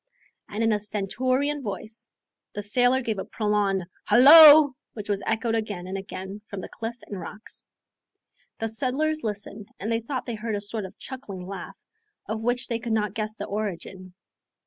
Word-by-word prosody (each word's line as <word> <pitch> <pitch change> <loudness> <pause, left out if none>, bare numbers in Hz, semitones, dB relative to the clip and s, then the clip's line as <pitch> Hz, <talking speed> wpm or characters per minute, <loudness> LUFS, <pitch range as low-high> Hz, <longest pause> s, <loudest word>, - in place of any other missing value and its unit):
And 215 +2 -2
in 225 -1 +3
a 210 - +1
stentorian 255 +8 -1
voice 215 0 -5 0.4
the 205 - -5
sailor 245 +5 +3
gave 220 -4 -2
a - - -2
prolonged 205 -3 0 0.2
"Halloo!" 295 +2 +9 0.2
which 210 -2 -7
was 200 -1 0
echoed 225 +1 0
again 210 -5 -2
and 185 +1 -5
again 195 +1 -7
from 200 - -6
the - - -8
cliff 230 +1 -5
and 200 -2 -6
rocks. 215 +4 -9 0.9
The 225 - -2
settlers 275 +7 0
listened 205 -1 -4
and 215 +4 -3
they 225 - +1
thought 255 +3 -4
they 240 - -4
heard 220 0 -3
a - - -1
sort 205 0 -4
of 190 - -11
chuckling 205 -9 -8
laugh, 190 -1 -8 0.5
of 220 +1 -4
which 245 +2 -1
they 230 -1 -2
could 230 0 -3
not 210 -3 0
guess 215 0 -3
the - - -5
origin. 190 -3 -5
215 Hz, 175 wpm, -25 LUFS, 200-240 Hz, 0.9 s, Halloo